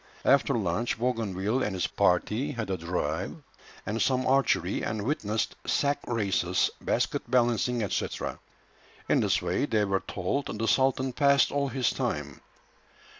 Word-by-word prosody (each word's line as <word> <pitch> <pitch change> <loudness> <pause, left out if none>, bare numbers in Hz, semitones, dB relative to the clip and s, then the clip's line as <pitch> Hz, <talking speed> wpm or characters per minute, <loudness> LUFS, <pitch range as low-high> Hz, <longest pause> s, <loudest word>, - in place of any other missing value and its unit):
After 140 0 +4
lunch 105 +3 -1
Bougainville 115 -1 -1
and 105 -6 -1
his 90 -3 0
party 105 - +1
had 110 -5 -4
a 95 - -1
drive 85 +2 -2 0.5
and 110 +2 -2
some 130 -1 +2
archery, 130 -9 +2
and 105 -1 -2
witnessed 110 -5 -1
sack 145 0 +1
races, 100 -6 +1
basket - - -1
balancing, 120 -2 +2
&c. - - -1 1.0
In - - +3
this - - +1
way, 90 +11 0
they 105 -5 +2
were 95 -1 +1
told, 100 +12 -3
the 115 +1 -1
sultan 130 +3 +2
passed 140 -1 +4
all 140 0 0
his 130 -2 0
time. - - -3
115 Hz, 140 wpm, -28 LUFS, 100-130 Hz, 1.0 s, After